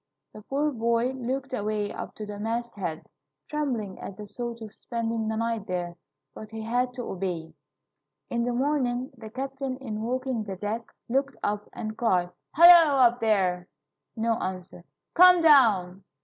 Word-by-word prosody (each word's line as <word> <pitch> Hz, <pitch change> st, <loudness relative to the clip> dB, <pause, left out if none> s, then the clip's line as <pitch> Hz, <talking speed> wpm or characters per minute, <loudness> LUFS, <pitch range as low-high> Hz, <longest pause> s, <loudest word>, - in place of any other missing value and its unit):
The 215 Hz, -, -10 dB
poor 285 Hz, +7 st, -1 dB
boy 235 Hz, 0 st, +1 dB
looked 265 Hz, +1 st, -4 dB
away 210 Hz, -2 st, -2 dB
up -, -, -7 dB
to 215 Hz, -, -6 dB
the 205 Hz, -1 st, -7 dB
masthead, 220 Hz, -7 st, -3 dB, 0.4 s
trembling 250 Hz, -10 st, -3 dB
at 190 Hz, -, -8 dB
the 210 Hz, -, -7 dB
thought 235 Hz, +2 st, -6 dB
of 215 Hz, -, -10 dB
spending 230 Hz, -2 st, -3 dB
the 220 Hz, -, -1 dB
night 230 Hz, -2 st, -2 dB
there, 175 Hz, -1 st, -3 dB, 0.4 s
but 215 Hz, -, -10 dB
he 220 Hz, 0 st, -6 dB
had 245 Hz, +3 st, 0 dB
to 245 Hz, -, -4 dB
obey. 175 Hz, -6 st, -4 dB, 0.7 s
In 235 Hz, -1 st, -1 dB
the 245 Hz, -, 0 dB
morning 255 Hz, 0 st, 0 dB
the 225 Hz, -3 st, -10 dB
captain, 270 Hz, +1 st, -4 dB
in 220 Hz, -5 st, -5 dB
walking 255 Hz, 0 st, -2 dB
the 195 Hz, -2 st, -6 dB
deck, 210 Hz, +4 st, -4 dB, 0.2 s
looked 270 Hz, +3 st, 0 dB
up, 210 Hz, 0 st, -2 dB
and 215 Hz, -1 st, -5 dB
cried, 180 Hz, -6 st, +1 dB, 0.2 s
"Halloo, 335 Hz, -3 st, +8 dB
up 245 Hz, -2 st, +5 dB
there!" 185 Hz, -5 st, +1 dB, 0.5 s
No 225 Hz, 0 st, 0 dB
answer. 185 Hz, -1 st, -6 dB, 0.3 s
"Come 360 Hz, 0 st, +8 dB
down!" 215 Hz, -, +4 dB
230 Hz, 160 wpm, -27 LUFS, 205-255 Hz, 0.7 s, Halloo